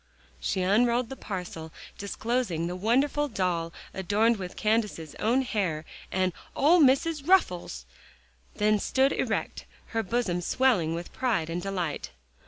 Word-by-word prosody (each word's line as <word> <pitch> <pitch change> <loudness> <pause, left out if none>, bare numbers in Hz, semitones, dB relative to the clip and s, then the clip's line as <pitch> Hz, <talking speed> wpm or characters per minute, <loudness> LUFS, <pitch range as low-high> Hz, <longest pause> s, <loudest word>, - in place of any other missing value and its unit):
She 190 -2 -1
unrolled 235 +5 +3
the 270 - -6
parcel, 180 -8 -6 0.3
disclosing 200 -4 -1
the 175 +1 -3
wonderful 265 +9 +2
doll 180 -8 -1 0.2
adorned 210 +5 +2
with 180 -2 -6
Candace's 210 -8 0
own 245 +5 +2
hair, 180 -10 -1 0.3
and 185 -1 +1 0.2
"Ole 320 +6 +5
Missus' 300 +2 +4
ruffles," 180 - +2 0.7
then 210 0 +3
stood 265 +6 +2
erect, - - -2 0.2
her 225 - 0
bosom 200 -4 -1
swelling 180 -7 +2
with 170 +1 -7
pride 210 -11 0
and 175 +1 -2
delight. 180 - -3
205 Hz, 130 wpm, -28 LUFS, 175-245 Hz, 0.7 s, Ole